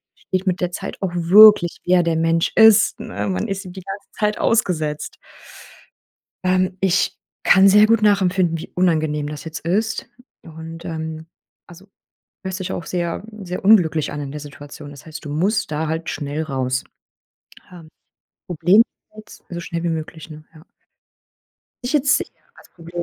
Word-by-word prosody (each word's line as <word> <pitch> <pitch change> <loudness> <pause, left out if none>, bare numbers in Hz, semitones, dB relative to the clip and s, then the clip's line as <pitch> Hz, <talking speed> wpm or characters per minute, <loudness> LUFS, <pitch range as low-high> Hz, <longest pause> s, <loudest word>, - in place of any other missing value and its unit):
versteht 185 +1 -4
mit 185 0 0
der 180 0 -1
Zeit 195 +2 -7
auch 190 -3 -2
wirklich, 180 +1 +6
wer 180 -1 +4
der 165 -1 0
Mensch 165 0 +1
ist, 220 -1 +5
ne? 105 +1 -5
Man 95 -1 -2
ist 195 0 -4
ihm 180 - -9
die 190 - -9
ganze 195 +2 -8
Zeit 210 0 0
ausgesetzt. 160 -9 -1 1.3
Ähm, 185 0 +1
ich 190 -1 +1 0.3
kann 195 +1 +6
sehr 210 +2 +6
gut 225 0 +2
nachempfinden, 185 -4 +2
wie - - -9
unangenehm 155 -4 0
das 150 -1 -8
jetzt 160 -1 -7
ist. 215 +7 -2 0.3
Und, 165 +1 -10
ähm, 160 -1 -6 0.4
also 175 +3 -15 0.6
hörst 190 0 -5
dich 185 - -4
auch 170 - -5
sehr, 175 0 -3 0.2
sehr 180 0 -6
unglücklich 165 -8 +4
an 145 - -5
in 140 -1 -6
der 150 - -6
Situation. 145 0 -11
Das 140 - -14
heißt, 155 -1 -9
du - - -6
musst 175 +5 -1
da 155 +1 -2
halt 160 +1 -3
schnell 145 +2 -4
raus, 130 -3 -2 0.9
ähm. 170 -3 -13 0.6
Problem 175 +4 +4 0.4
jetzt 215 0 -14
so 170 - -6
schnell 170 0 -5
wie 170 - -1
möglich, 160 0 -6
ne, 155 0 -11
ja? 155 +1 -17 1.2
Ich 245 - -3
jetzt 295 +1 +3
sehe - - -3 0.3
als - - -19
Problem 170 0 -7
170 Hz, 165 wpm, -20 LUFS, 155-190 Hz, 1.3 s, wirklich